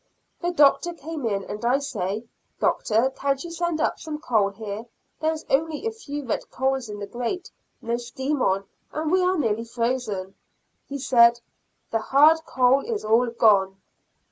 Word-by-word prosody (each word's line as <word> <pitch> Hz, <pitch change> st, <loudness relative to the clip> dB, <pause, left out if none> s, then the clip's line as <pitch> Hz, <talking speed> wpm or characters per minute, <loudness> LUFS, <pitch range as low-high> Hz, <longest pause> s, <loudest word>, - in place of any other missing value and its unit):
The 350 Hz, -, 0 dB
Doctor 335 Hz, +2 st, +4 dB
came 310 Hz, -5 st, -5 dB
in 200 Hz, -2 st, -1 dB
and 210 Hz, +3 st, -7 dB
I 245 Hz, +3 st, +3 dB
say, 220 Hz, -7 st, -3 dB, 0.4 s
"Doctor, 230 Hz, +4 st, +2 dB
can't 275 Hz, -1 st, -1 dB
you 345 Hz, -, -7 dB
send 340 Hz, -1 st, -1 dB
up -, -, 0 dB
some 310 Hz, -2 st, -5 dB
coal, 220 Hz, -9 st, +1 dB
there 225 Hz, +8 st, -5 dB
is 320 Hz, 0 st, -6 dB
only 310 Hz, +6 st, 0 dB
a 450 Hz, -, 0 dB
few 295 Hz, -11 st, -7 dB
red 230 Hz, -, -3 dB
coals 265 Hz, -2 st, -1 dB
in 205 Hz, -, -6 dB
the 205 Hz, -, -5 dB
grate, 245 Hz, -, -4 dB, 0.3 s
no 235 Hz, +1 st, -1 dB
steam 265 Hz, +4 st, -3 dB
on, 195 Hz, +1 st, +1 dB, 0.3 s
and 310 Hz, 0 st, -2 dB
we 370 Hz, 0 st, +4 dB
are 365 Hz, +1 st, +2 dB
nearly 230 Hz, -6 st, 0 dB
frozen?" 230 Hz, -5 st, -2 dB, 0.5 s
He 280 Hz, -, -4 dB
said, 240 Hz, -3 st, +5 dB, 0.5 s
"The 225 Hz, -, +1 dB
hard 305 Hz, +7 st, +5 dB
coal 255 Hz, +2 st, +3 dB
is 445 Hz, -, -3 dB
all 230 Hz, +3 st, +4 dB
gone." 200 Hz, -5 st, +3 dB
255 Hz, 170 wpm, -24 LUFS, 225-310 Hz, 0.5 s, said